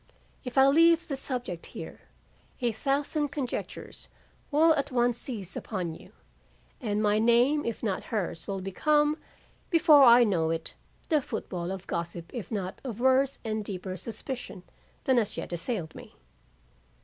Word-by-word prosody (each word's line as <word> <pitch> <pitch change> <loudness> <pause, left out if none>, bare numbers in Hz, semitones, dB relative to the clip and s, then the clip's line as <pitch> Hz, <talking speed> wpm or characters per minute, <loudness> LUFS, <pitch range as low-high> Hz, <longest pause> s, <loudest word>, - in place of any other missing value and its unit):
If 250 0 -7
I 265 - +8
leave 330 +4 +5
the 280 - -2
subject 245 -10 -4
here, - - -8 0.6
a 240 -2 +1
thousand 280 +5 0
conjectures 270 -3 -5 0.4
will 315 +2 +5
at 285 -2 -1
once 240 -1 +1
seize 205 -8 -7
upon 180 -6 -3
you, - - -14 0.7
and 210 -3 -1
my 210 0 +3
name 240 +6 +4
if 230 0 -4
not 200 -4 -2
hers 180 -7 -3
will 195 -1 -3
become, 295 - +2 0.5
before 320 -4 +6
I 240 -2 +8
know 175 -8 +1
it, 165 0 -3 0.4
the 310 -3 +3
football 180 -8 -4
of 190 -1 -6
gossip 170 0 -5
if 240 -3 -6
not 195 -2 -4
of 240 -5 -5
worse 260 +2 +3
and 215 -1 -2
deeper 185 -2 -5
suspicion 225 -1 -6 0.4
than 260 -2 +3
has 220 -4 0
yet - - -5
assailed 170 -1 -3
me. - - -12
235 Hz, 150 wpm, -28 LUFS, 190-275 Hz, 0.7 s, I